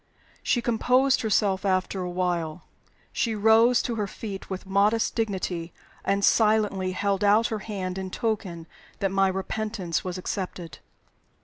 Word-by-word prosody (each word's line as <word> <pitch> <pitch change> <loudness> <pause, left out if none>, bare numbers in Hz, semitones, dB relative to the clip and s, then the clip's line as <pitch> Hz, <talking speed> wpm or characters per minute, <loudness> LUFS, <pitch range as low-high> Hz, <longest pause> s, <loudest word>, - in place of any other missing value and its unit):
She 240 - 0
composed 250 +3 +3
herself 200 -3 +1
after 190 0 0
a 180 - -3
while. 175 -2 -2 0.5
She 225 -2 0
rose 225 +3 +5
to 235 -2 -3
her 210 -2 -1
feet 195 -1 -7
with 190 0 -5
modest 205 +4 +2
dignity, 185 -6 -2 0.3
and 200 0 +1
silently 210 -4 +2
held 200 +1 0
out 210 +3 +4
her 220 - -2
hand 190 -3 -4
in 190 0 -4
token 195 -7 -3 0.3
that 195 -1 -1
my 195 0 +3
repentance 190 -1 -2
was 185 -1 -4
accepted. 180 -2 -5
200 Hz, 140 wpm, -26 LUFS, 185-220 Hz, 0.5 s, rose